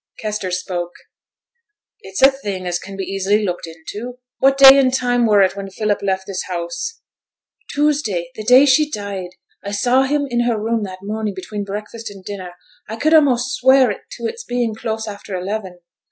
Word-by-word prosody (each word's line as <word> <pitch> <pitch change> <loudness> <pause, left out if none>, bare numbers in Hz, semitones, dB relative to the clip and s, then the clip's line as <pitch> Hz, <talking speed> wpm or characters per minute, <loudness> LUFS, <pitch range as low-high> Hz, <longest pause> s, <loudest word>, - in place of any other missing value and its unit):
Kester 210 -3 -3
spoke. 175 -1 -3 1.1
'It's 190 +7 -4
a 270 - +9
thing 200 -9 -5
as 175 0 -1
can 195 0 -9
be 195 - -3
easy 195 +3 0
looked 180 -2 -3
into. 205 +10 -8 0.2
What 270 0 +4
day 275 0 +10
an' 260 -2 +4
time 245 -2 +1
were 205 -2 +5
it 190 0 +1
when 200 -1 -6
Philip 210 +1 -1
left 190 -1 -1
this 195 -2 -4
house?' 185 - -4 0.7
'Tuesday 275 - 0
the 215 - -7
day 250 +5 +7
she 295 +2 +4
died. 200 -7 -5 0.3
I 200 - -5
saw 245 +6 +2
him 285 +1 0
in 240 -2 0
her 235 -2 +1
room 225 +1 -1
that 185 0 -9
morning 210 0 -3
between 200 +2 -5
breakfast 210 +3 -6
and 195 -2 -13
dinner; 185 -3 -7 0.3
I 220 - -4
could 310 +8 +1
a'most 265 -5 +4
swear 260 0 +5 0.2
to 235 - -7
it's 460 - -4
being 245 - -1
close 220 0 -4
after 200 -2 -7
eleven. 185 -1 -5
215 Hz, 180 wpm, -19 LUFS, 190-250 Hz, 1.1 s, day